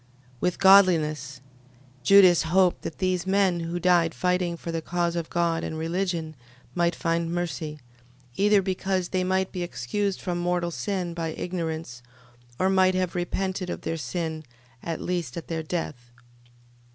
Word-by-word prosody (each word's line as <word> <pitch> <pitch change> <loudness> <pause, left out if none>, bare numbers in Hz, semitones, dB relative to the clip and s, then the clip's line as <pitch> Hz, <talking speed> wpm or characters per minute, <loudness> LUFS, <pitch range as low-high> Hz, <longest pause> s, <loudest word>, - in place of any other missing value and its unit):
With 180 +4 0
godliness... 155 -9 +4 0.6
Judas 185 +3 +7
hoped 180 +2 +2
that 165 - -6
these 185 -1 -1
men 190 -2 +2
who 170 +1 -3
died 175 -2 +3
fighting 180 -1 0
for 170 - -6
the 165 -1 -2
cause 175 +1 -1
of 170 -2 -3
God 170 -1 0
and 160 - -4
religion, 165 -1 -2 0.4
might 170 -1 +1
find 165 -1 -1
mercy: 155 -3 -3 0.6
either 205 0 +4
because 185 -1 -1
they 185 -1 0
might 190 0 0
be 180 - -4
excused 185 +5 -2
from 175 -2 -3
mortal 175 0 0
sin 185 -2 -3
by 165 -1 -3
ignorance; 160 -9 -4 0.6
or 185 - +2
might 190 -1 +3
have 185 -1 0
repented 185 +1 -2
of - - -4
their 165 - -3
sin, 160 +2 -4 0.4
at 165 -1 -4
least 175 -7 -3
at 170 - -7
their 165 -1 -2
death. 150 -7 -5
175 Hz, 150 wpm, -26 LUFS, 165-185 Hz, 0.6 s, Judas